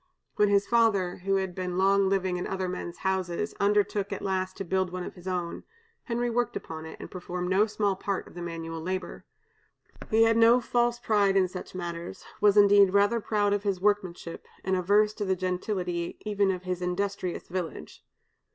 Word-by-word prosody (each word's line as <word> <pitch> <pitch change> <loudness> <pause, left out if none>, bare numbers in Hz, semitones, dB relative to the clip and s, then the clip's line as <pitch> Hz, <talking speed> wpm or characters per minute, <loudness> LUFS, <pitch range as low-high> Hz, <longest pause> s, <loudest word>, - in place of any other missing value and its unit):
When 210 -1 +3
his 200 0 +3
father, 205 -6 +2
who 195 +2 0
had 190 -2 -1
been 180 -1 -3
long 195 0 +3
living 190 -2 0
in 180 - -3
other 190 -1 -2
men's 175 -1 -5
houses, 190 +1 -2
undertook, 205 0 +1
at - - -4
last, 185 -1 -2
to 195 - -3
build 190 0 0
one 180 0 -4
of - - -7
his 180 0 -12
own, 175 -2 -3 0.4
Henry 240 0 -1
worked 240 0 0
upon 160 0 -6
it, - - -10
and - - -9
performed 180 0 -4
no 205 +3 +4
small 205 -2 0
part 195 0 -3
of - - -15
the 175 - -8
manual 165 -1 -5
labor. 185 +2 -4 0.8
He 225 0 +5
had 225 0 +4
no 230 +2 +6
false 240 0 +1
pride 205 -4 +2
in 185 -1 +4
such 185 0 -8
matters, 175 0 -6
was, 210 -1 +4
indeed, 200 -2 +6
rather 205 +4 +4
proud 205 -2 +1
of 205 - 0
his 200 -3 -1
workmanship, 185 -4 -1 0.2
and 190 0 +1
averse 205 +4 +3
to 210 - -4
the 190 -1 +1
gentility 180 -1 -2
even 205 -2 +1
of 185 -1 -2
his 180 -1 -3
industrious 185 0 -2
village. 170 - -6
190 Hz, 190 wpm, -28 LUFS, 180-205 Hz, 0.8 s, no